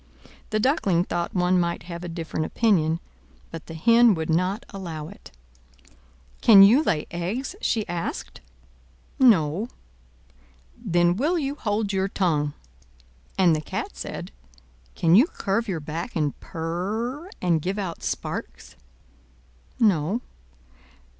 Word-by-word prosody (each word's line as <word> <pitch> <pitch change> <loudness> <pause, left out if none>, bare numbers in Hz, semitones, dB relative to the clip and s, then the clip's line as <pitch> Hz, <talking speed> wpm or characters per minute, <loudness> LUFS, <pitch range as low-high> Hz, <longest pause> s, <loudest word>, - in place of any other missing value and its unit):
The 215 - 0
Duckling 200 - +2
thought 175 0 -3
one 180 0 +3
might 170 -1 -1
have 170 +1 -7
a 175 - -5
different 165 -2 -4
opinion, 170 -8 +2 0.5
but 165 -1 -8
the 165 - -8
Hen 230 +5 +5
would 160 0 -2
not 185 +9 0
allow 165 -6 -6
it. - - -14 1.1
"Can 200 -4 +9
you 230 +9 +7
lay 155 - 0
eggs?" 195 - -3
she 220 -3 0
asked. 175 -1 -5 0.8
"No." 200 - +4 1.1
"Then 175 -5 +1
will 305 - +1
you 280 -3 -1
hold 210 -6 -2
your 190 0 +1
tongue!" 155 -7 0 0.8
And 175 -4 +4
the 155 - -2
Cat - - -4
said, - - -6 0.6
"Can 165 0 +2
you 235 - +7
curve 225 - -2
your 180 -5 -2
back, 160 +10 -6
and 150 -4 0
purr, 210 - -4
and 170 -3 +1
give 190 +5 -2
out 185 -5 -4
sparks?" - - -5 1.0
"No." 200 0 +2
185 Hz, 125 wpm, -24 LUFS, 165-220 Hz, 1.1 s, Can